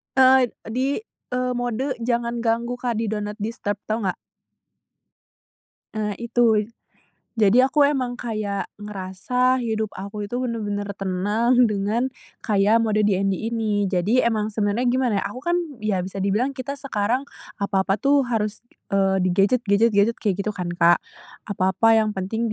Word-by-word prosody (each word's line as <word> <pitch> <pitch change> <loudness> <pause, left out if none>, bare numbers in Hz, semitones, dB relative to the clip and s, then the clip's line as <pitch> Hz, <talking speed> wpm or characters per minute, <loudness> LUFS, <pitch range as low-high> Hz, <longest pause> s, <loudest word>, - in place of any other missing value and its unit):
Eee, 260 -1 +6 0.2
di, 265 +4 0 0.4
eee, 250 0 0
mode 245 +3 -2
jangan 235 0 -1
ganggu, 235 +1 -1
Kak, 245 -2 -1
di 220 -1 -2
do 215 - -1
not 210 0 -5
disturb, 210 -1 -3
tau 220 +1 -2
nggak? 190 -4 -1 1.8
Eee, 210 -1 -2
itu 230 -2 +2 0.7
jadi, 225 +3 +5
aku 290 +2 +1
emang 255 -4 -1
kayak 215 -5 -3
ngerasa 210 +6 -1
hidup 220 -3 -2
aku 200 +2 -6
itu 245 - -3
bener-bener 215 -5 -2
tenang, 205 +6 +2
dengan 220 +5 -1 0.3
kayak 210 +1 +3
mode 215 -2 +1
DND 195 +1 +1
ini. 210 -4 0
Jadi 200 +7 +2
emang 215 -2 0
sebenarnya 210 +3 0
gimana 245 -4 +1
ya, - - -1
aku 250 - -7
kan 345 +3 +1 0.2
ya 215 -3 0
bisa 190 +1 -5
dibilang 215 +8 0
kita 275 +2 -5
sekarang 250 0 -1 0.3
apa-apa 195 -1 0
tuh 280 +6 +3
harus, 215 -2 -1 0.3
eee, 195 -1 +3
di 185 - +1
gadget 200 +6 +2
gadget 205 +3 +4
gadget 210 +2 +2
kayak 200 -2 -1
gitu 215 - -1
kan, 180 -3 -4
Kak. 170 0 +5 0.5
Apa-apa 200 +4 +3
yang 215 -1 +1
penting 210 +5 -2
220 Hz, 150 wpm, -23 LUFS, 200-245 Hz, 1.8 s, Eee